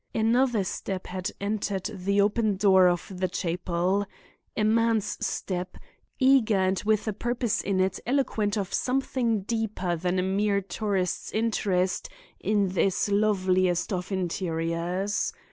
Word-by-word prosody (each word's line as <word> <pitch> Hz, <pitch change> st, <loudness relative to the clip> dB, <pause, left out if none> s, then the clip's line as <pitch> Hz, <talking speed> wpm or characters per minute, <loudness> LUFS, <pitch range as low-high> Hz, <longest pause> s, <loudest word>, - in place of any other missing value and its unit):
"Another 230 Hz, 0 st, +2 dB
step 185 Hz, 0 st, -4 dB
had 185 Hz, 0 st, -4 dB
entered 200 Hz, -2 st, -2 dB
the 200 Hz, +1 st, 0 dB
open 210 Hz, 0 st, +2 dB
door 190 Hz, -2 st, +5 dB
of 175 Hz, +2 st, -2 dB
the 185 Hz, +1 st, 0 dB
chapel—a 180 Hz, +4 st, -3 dB
man's 225 Hz, 0 st, +1 dB
step—eager 215 Hz, +6 st, 0 dB
and 190 Hz, 0 st, +1 dB
with 215 Hz, +1 st, +1 dB
a 215 Hz, -, 0 dB
purpose 240 Hz, +1 st, -1 dB
in 195 Hz, -1 st, -1 dB
it 190 Hz, 0 st, +1 dB
eloquent 225 Hz, -6 st, 0 dB
of 200 Hz, -1 st, -3 dB
something 250 Hz, -4 st, 0 dB
deeper 205 Hz, -4 st, -2 dB
than 180 Hz, +2 st, -1 dB
a 185 Hz, -, +1 dB
mere 200 Hz, +2 st, +1 dB
tourist's 195 Hz, -2 st, -2 dB
interest 200 Hz, -5 st, 0 dB, 0.3 s
in 205 Hz, -2 st, +1 dB
this 190 Hz, +2 st, +1 dB
loveliest 185 Hz, -3 st, +2 dB
of 180 Hz, +2 st, -3 dB
interiors. 180 Hz, -, -1 dB
200 Hz, 125 wpm, -27 LUFS, 185-215 Hz, 0.3 s, door